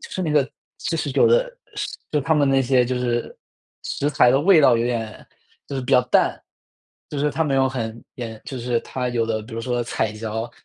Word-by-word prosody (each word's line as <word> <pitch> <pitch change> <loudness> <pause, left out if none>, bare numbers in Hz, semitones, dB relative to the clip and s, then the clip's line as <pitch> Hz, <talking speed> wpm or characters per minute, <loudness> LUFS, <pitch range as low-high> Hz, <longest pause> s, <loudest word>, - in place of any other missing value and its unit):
就 - - -10
是 185 - -3
那 160 - -1
个 140 -2 +3 0.4
就 165 - 0
是 145 -2 -2
有 - - +4
的 - - +3 0.6
就 150 - +1
它 160 +3 +1
们 145 -2 +3
那 135 0 +3
些 125 -1 +3
就 125 0 -2
是 120 -1 -2 0.5
食 145 - -2
材 130 -4 +5
的 135 - +4
味 170 0 +6
道 125 -4 +6
有 115 - 0
点 115 -3 -4 0.4
就 140 - -6
是 130 - -1
比 125 - -5
较 125 - +7
淡， - - +2 0.7
就 145 - -4
是 150 +1 +1
它 160 - 0
没 140 -2 0
有 135 0 +3
很 115 -3 -5
也 115 -3 -6
就 130 - -6
是 120 0 0
它 125 -1 -4
有 120 -2 0
的 110 -1 -1
比 115 +1 -10
如 115 - -3
说 120 0 -1
彩 110 -2 -2
椒， 110 +2 -4
125 Hz, 250 characters per minute, -22 LUFS, 115-145 Hz, 0.7 s, 较